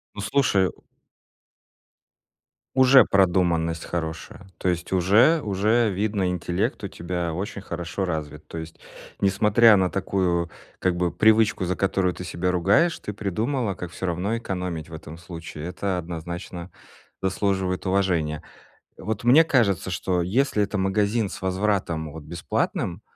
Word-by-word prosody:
Ну, 105 Hz, -, -5 dB
слушаю! 100 Hz, -, +2 dB, 2.0 s
Уже 130 Hz, 0 st, +7 dB
продуманность 85 Hz, -3 st, +2 dB
хорошая, 85 Hz, +2 st, -5 dB
то 90 Hz, -, 0 dB
есть 90 Hz, +1 st, -4 dB
уже 110 Hz, -, +4 dB
уже 105 Hz, +3 st, +2 dB
видно, 100 Hz, -1 st, -1 dB
интеллект 90 Hz, 0 st, -2 dB
у -, -, -3 dB
тебя 85 Hz, -1 st, -4 dB
очень 100 Hz, +3 st, -4 dB
хорошо 90 Hz, +1 st, -4 dB
развит. 80 Hz, -4 st, -5 dB
То -, -, -8 dB
есть, 80 Hz, 0 st, -8 dB, 0.4 s
несмотря 105 Hz, +3 st, +5 dB
на 95 Hz, -2 st, +2 dB
такую 90 Hz, -3 st, 0 dB, 0.3 s
как 90 Hz, -1 st, 0 dB
бы 90 Hz, -1 st, 0 dB
привычку, 110 Hz, -3 st, +3 dB
за 90 Hz, 0 st, -1 dB
которую 95 Hz, -1 st, +1 dB
ты 90 Hz, -, -7 dB
себя 90 Hz, +1 st, -2 dB
ругаешь, 100 Hz, -, +3 dB
ты 105 Hz, -, -6 dB
придумала, 110 Hz, +2 st, -2 dB
как 90 Hz, -1 st, -7 dB
всё 95 Hz, -, -5 dB
равно 90 Hz, +7 st, -1 dB
экономить 90 Hz, -7 st, -4 dB
в 80 Hz, -, -10 dB
этом 80 Hz, +1 st, -9 dB
случае. 85 Hz, -3 st, -8 dB
Это 90 Hz, +1 st, -2 dB
однозначно 85 Hz, +1 st, -6 dB, 0.5 s
заслуживает 95 Hz, -1 st, -1 dB
уважения. 90 Hz, -6 st, 0 dB, 0.5 s
Вот 110 Hz, +1 st, -4 dB
мне 135 Hz, +7 st, +7 dB
кажется, 110 Hz, -, +1 dB
что 90 Hz, 0 st, -1 dB
если 105 Hz, +4 st, +1 dB
это 100 Hz, 0 st, -2 dB
магазин 100 Hz, +3 st, +1 dB
с -, -, -9 dB
возвратом, 95 Hz, -5 st, -1 dB
вот, 80 Hz, -, -9 dB
бесплатным, 85 Hz, +3 st, -2 dB
95 Hz, 135 wpm, -24 LUFS, 85-105 Hz, 2.0 s, Уже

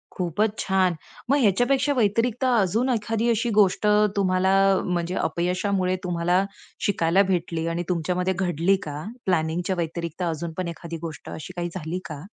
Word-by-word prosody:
खूपच 200 Hz, +5 st, 0 dB
छान! 190 Hz, -2 st, +2 dB, 0.3 s
मग 280 Hz, -, +4 dB
ह्याच्यापेक्षा 255 Hz, +7 st, +3 dB
व्यतिरिक्त 230 Hz, +3 st, +1 dB
अजून 230 Hz, 0 st, +2 dB
एखादी 225 Hz, 0 st, 0 dB
अशी 235 Hz, +1 st, +1 dB
गोष्ट 200 Hz, +1 st, +3 dB, 0.3 s
तुम्हाला 190 Hz, -1 st, +2 dB, 0.3 s
म्हणजे 175 Hz, 0 st, -1 dB
अपयशामुळे 185 Hz, +1 st, 0 dB
तुम्हाला 175 Hz, +1 st, +1 dB, 0.4 s
शिकायला 180 Hz, -1 st, +3 dB
भेटली 165 Hz, -2 st, -1 dB
आणि 175 Hz, -, -1 dB
तुमच्यामध्ये 180 Hz, +2 st, 0 dB
घडली 175 Hz, 0 st, +2 dB
का? 150 Hz, +1 st, -5 dB, 0.2 s
प्लॅनिंगच्या 175 Hz, +1 st, 0 dB
व्यतिरिक्त 170 Hz, 0 st, -4 dB
अजून 165 Hz, +1 st, -4 dB
पण 185 Hz, -1 st, -2 dB
एखादी 170 Hz, 0 st, -6 dB
गोष्ट 160 Hz, -5 st, -7 dB
अशी 160 Hz, +3 st, -7 dB
काही 175 Hz, 0 st, -2 dB
झाली 175 Hz, 0 st, -3 dB
का? 150 Hz, -2 st, -7 dB
185 Hz, 140 wpm, -24 LUFS, 170-205 Hz, 0.4 s, मग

